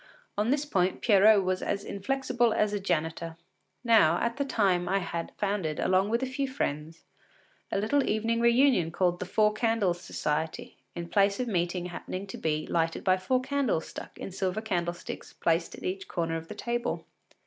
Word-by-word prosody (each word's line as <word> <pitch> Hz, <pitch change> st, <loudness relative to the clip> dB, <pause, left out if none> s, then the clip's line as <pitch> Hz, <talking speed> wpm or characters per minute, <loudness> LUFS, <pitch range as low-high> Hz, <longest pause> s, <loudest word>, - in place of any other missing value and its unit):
On 210 Hz, +3 st, 0 dB
this 285 Hz, +2 st, +1 dB
point 185 Hz, -9 st, 0 dB
Pierrot 205 Hz, -1 st, +6 dB
was 185 Hz, 0 st, -1 dB
as 200 Hz, 0 st, -2 dB
inflexible 240 Hz, +1 st, 0 dB
as 210 Hz, -1 st, +1 dB
a 205 Hz, -, 0 dB
janitor. 165 Hz, -2 st, -2 dB, 0.5 s
Now, 215 Hz, -9 st, +5 dB
at 235 Hz, +1 st, -1 dB
that 280 Hz, -1 st, -2 dB
time 185 Hz, -5 st, +2 dB
I 195 Hz, -, +2 dB
had 170 Hz, -3 st, -4 dB
founded, 195 Hz, -7 st, -1 dB
along 190 Hz, +2 st, +2 dB
with 235 Hz, +3 st, +1 dB
a -, -, +2 dB
few 270 Hz, +1 st, -2 dB
friends, 160 Hz, -, -4 dB, 0.7 s
a -, -, 0 dB
little 260 Hz, +8 st, +1 dB
evening 225 Hz, +2 st, +1 dB
reunion 235 Hz, -, +4 dB
called 175 Hz, 0 st, 0 dB
“The 185 Hz, -, -4 dB
Four 210 Hz, +2 st, +3 dB
Candles 215 Hz, -6 st, +1 dB
Society,” 155 Hz, 0 st, -3 dB, 0.2 s
the 170 Hz, -, -4 dB
place 200 Hz, +3 st, +2 dB
of 250 Hz, -, -1 dB
meeting 175 Hz, -3 st, -1 dB
happening 185 Hz, +2 st, -5 dB
to 195 Hz, -, -8 dB
be 155 Hz, -1 st, -1 dB
lighted 165 Hz, -1 st, -1 dB
by 185 Hz, -1 st, +4 dB
four 250 Hz, +7 st, +1 dB
candles 265 Hz, -, 0 dB
stuck -, -, -9 dB
in -, -, -6 dB
silver 190 Hz, +2 st, -1 dB
candlesticks 175 Hz, -5 st, -4 dB
placed 165 Hz, +1 st, 0 dB
at -, -, -12 dB
each 190 Hz, +1 st, -3 dB
corner 165 Hz, -1 st, -2 dB
of 165 Hz, 0 st, -5 dB
the -, -, -8 dB
table. 240 Hz, 0 st, -2 dB
195 Hz, 180 wpm, -28 LUFS, 175-230 Hz, 0.7 s, Pierrot